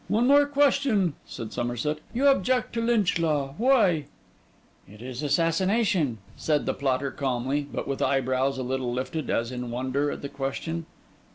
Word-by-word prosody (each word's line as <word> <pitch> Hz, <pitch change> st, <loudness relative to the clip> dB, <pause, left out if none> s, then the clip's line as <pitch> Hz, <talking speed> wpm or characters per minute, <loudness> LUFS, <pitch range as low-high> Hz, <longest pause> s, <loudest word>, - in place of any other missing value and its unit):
'One 225 Hz, +3 st, +2 dB
more 285 Hz, +2 st, +6 dB
question,' 275 Hz, -, +2 dB
said 115 Hz, -1 st, -7 dB
Somerset: 120 Hz, +6 st, -2 dB
'you 255 Hz, +4 st, 0 dB
object 255 Hz, -2 st, +2 dB
to 230 Hz, -, -1 dB
Lynch 230 Hz, -7 st, +2 dB
Law? 145 Hz, -4 st, 0 dB
why?' 215 Hz, -, +3 dB, 0.8 s
'It 105 Hz, +1 st, -14 dB
is 125 Hz, +2 st, -6 dB
assassination,' 170 Hz, -, +1 dB, 0.2 s
said 150 Hz, -2 st, 0 dB
the -, -, 0 dB
plotter 135 Hz, 0 st, -1 dB
calmly, 135 Hz, +2 st, -1 dB
but -, -, -4 dB
with 140 Hz, -, -3 dB
eyebrows 135 Hz, 0 st, +1 dB
a 130 Hz, -, -3 dB
little 130 Hz, -1 st, -2 dB
lifted, 130 Hz, +5 st, -3 dB
as 115 Hz, +1 st, 0 dB
in 125 Hz, -1 st, -5 dB
wonder 130 Hz, +4 st, -1 dB
at -, -, -6 dB
the -, -, -2 dB
question. 155 Hz, +5 st, -4 dB
145 Hz, 160 wpm, -26 LUFS, 130-200 Hz, 0.8 s, more